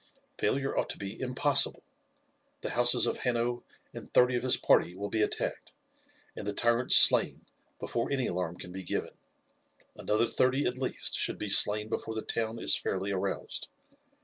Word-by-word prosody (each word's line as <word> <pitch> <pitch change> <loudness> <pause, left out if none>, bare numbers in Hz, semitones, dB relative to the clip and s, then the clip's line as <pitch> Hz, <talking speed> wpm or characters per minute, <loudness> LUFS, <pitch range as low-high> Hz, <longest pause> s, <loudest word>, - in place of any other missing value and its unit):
"Failure 135 0 -1
ought - - -2
to - - -6
be 100 +2 -8
impossible. 130 +2 +2 0.8
The - - -5
houses 120 0 +4
of - - -3
Hanno 120 0 -2 0.3
and - - -11
thirty 125 0 +3
of 120 - -1
his 130 0 +1
party 90 - +1
will 100 +2 -6
be 110 - -1
attacked, - - -3 0.6
and - - -8
the 105 - -2
tyrants 120 +1 +4
slain - - +7 0.3
before 115 +3 -4
any 135 -3 -1
alarm 90 -1 -4
can 90 - -10
be 95 +1 -8
given. 90 - -4 0.8
Another 110 +2 -1
thirty 130 +4 0
at 125 +1 -3
least 130 - -3
should - - -2
be 105 - -6
slain 105 +2 +3
before 110 0 -5
the 110 - -4
town 115 0 -3
is - - +1
fairly 95 +1 -4
aroused. 95 0 -5
115 Hz, 170 wpm, -28 LUFS, 100-125 Hz, 0.8 s, slain